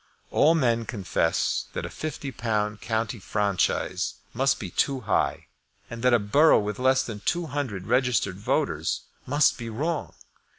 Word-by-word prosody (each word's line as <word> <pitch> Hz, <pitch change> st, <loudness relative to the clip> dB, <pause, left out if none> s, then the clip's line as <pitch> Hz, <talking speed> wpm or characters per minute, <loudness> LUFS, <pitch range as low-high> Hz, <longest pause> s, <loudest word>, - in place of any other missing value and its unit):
All 160 Hz, +3 st, +5 dB
men 120 Hz, -6 st, +1 dB
confess 95 Hz, -6 st, 0 dB
that -, -, -3 dB
a -, -, -5 dB
£50 110 Hz, -8 st, -3 dB
county 115 Hz, +1 st, -2 dB
franchise 100 Hz, -2 st, 0 dB, 0.2 s
must 135 Hz, +3 st, +2 dB
be 95 Hz, -4 st, -6 dB
too 135 Hz, +6 st, 0 dB
high, 105 Hz, -, 0 dB, 0.5 s
and 115 Hz, 0 st, -6 dB
that 125 Hz, +1 st, +4 dB
a 120 Hz, -, +6 dB
borough 130 Hz, +10 st, +5 dB
with 105 Hz, +1 st, -2 dB
less 130 Hz, +1 st, +3 dB
than 110 Hz, -3 st, -6 dB
two 170 Hz, +11 st, -1 dB
hundred 130 Hz, -, -4 dB
registered 125 Hz, -7 st, +1 dB
voters 105 Hz, -, 0 dB, 0.3 s
must 145 Hz, +1 st, +3 dB
be 115 Hz, -1 st, -5 dB
wrong. 150 Hz, +8 st, -3 dB
115 Hz, 145 wpm, -26 LUFS, 105-135 Hz, 0.5 s, a